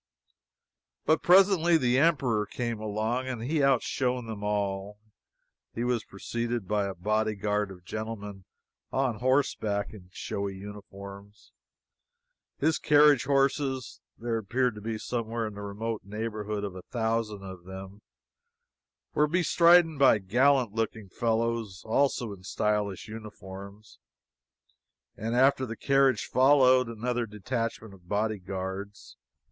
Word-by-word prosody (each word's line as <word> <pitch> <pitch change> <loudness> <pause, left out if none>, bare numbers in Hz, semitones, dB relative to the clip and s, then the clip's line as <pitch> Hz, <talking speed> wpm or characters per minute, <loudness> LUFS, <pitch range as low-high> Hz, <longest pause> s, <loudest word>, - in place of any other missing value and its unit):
But 155 - +3
presently 180 -2 +5
the 125 -3 +2
Emperor 130 -10 +2
came 115 +1 -3
along 110 +4 -2
and 120 -3 -4
he 150 +4 0
outshone 125 -2 +1
them 110 -2 -6
all. 100 -1 -2 0.8
He 115 - -2
was 120 -3 0
preceded 115 +1 -4
by 105 -1 +1
a 95 - -5
bodyguard 105 +1 0
of 90 -2 -12
gentlemen 105 -2 -6 0.5
on 130 -5 0
horseback 120 -6 0
in 90 -4 -13
showy 100 +1 -4
uniforms, 100 0 -11 1.1
his 160 -1 +1
carriage 150 -3 +5
horses 135 -1 0 0.2
(there 115 -1 -2
appeared 120 +4 0
to 105 - -10
be 110 +1 -3
somewhere 115 0 -3
in 105 - -5
the 100 - -8
remote 105 +2 -4
neighborhood 105 0 -4
of 100 -2 -4
a 95 - -7
thousand 110 -2 -2
of 95 -2 -9
them,) 95 +2 -9 1.1
were 150 - +3
bestridden 170 -1 +4
by 135 -5 +6
gallant 120 +4 +2
looking 110 -2 -3
fellows, 115 -3 -1
also 120 -1 +1
in 95 - -12
stylish 105 -1 -1
uniforms, 105 -1 -10 1.2
and 115 +3 -3
after 130 +1 +4
the 115 0 -6
carriage 135 -5 +3
followed 130 -1 +5
another 120 +1 -2
detachment 110 0 -4
of 90 -2 -18
bodyguards. 100 -1 -3
110 Hz, 120 wpm, -28 LUFS, 100-125 Hz, 1.2 s, by